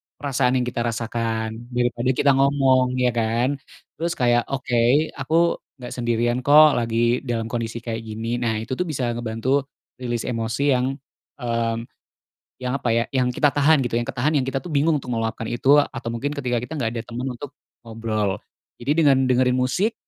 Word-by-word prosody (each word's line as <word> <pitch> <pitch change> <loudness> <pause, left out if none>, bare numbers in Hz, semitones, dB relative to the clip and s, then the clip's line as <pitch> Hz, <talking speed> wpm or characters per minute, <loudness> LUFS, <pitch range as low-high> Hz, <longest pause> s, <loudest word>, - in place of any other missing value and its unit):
perasaan 130 -2 0
yang 125 - +2
kita 125 -1 -3
rasakan, 115 0 -3
daripada 120 0 -1
kita 140 +2 +4
ngomong, 135 -2 +3
ya 125 -1 +2
kan? 120 +5 0 0.4
Terus 170 +1 -1
kayak, 120 -1 +2
oke 130 +2 +1
aku 165 +5 +2 0.2
gak - - -6
sendirian 120 0 0
kok, 145 +1 +6
lagi 115 +1 +1
dalam 115 -1 -2
kondisi 115 0 -3
kayak 115 -1 -3
gini. 115 +2 -3
Nah 115 -2 0
itu 125 - -11
tuh 180 +7 -1
bisa 130 -6 -1
ngebantu 120 +4 -1 0.3
release 120 -2 -2
emosi 115 +4 0
yang, 130 +1 +1 0.5
mmm, 115 -1 -1 0.7
yang 125 0 -3
apa 125 -3 -1
ya, 115 +1 +2
yang 125 -1 +2
kita 140 +3 +2
tahan 145 -2 +4
gitu, 120 0 0
yang - - -5
ketahan, 140 +5 0
yang 140 - +3
kita 135 - -2
tuh 160 +2 -6
bingung 150 +2 +3
untuk 125 -3 -5
meluapkan 115 0 -2
itu 135 +6 +3
atau 120 -5 0
mungkin 130 +5 -3
ketika 125 -4 -1
kita 125 +7 -5
gak 125 -7 -1
ada 115 0 -5
temen 125 +3 -4
untuk 145 0 -8 0.3
ngobrol, 110 -3 -2 0.4
jadi 145 +6 0
dengan 135 -4 +4
dengerin 125 0 +3
musik, 190 - +1
125 Hz, 175 wpm, -23 LUFS, 115-135 Hz, 0.7 s, kok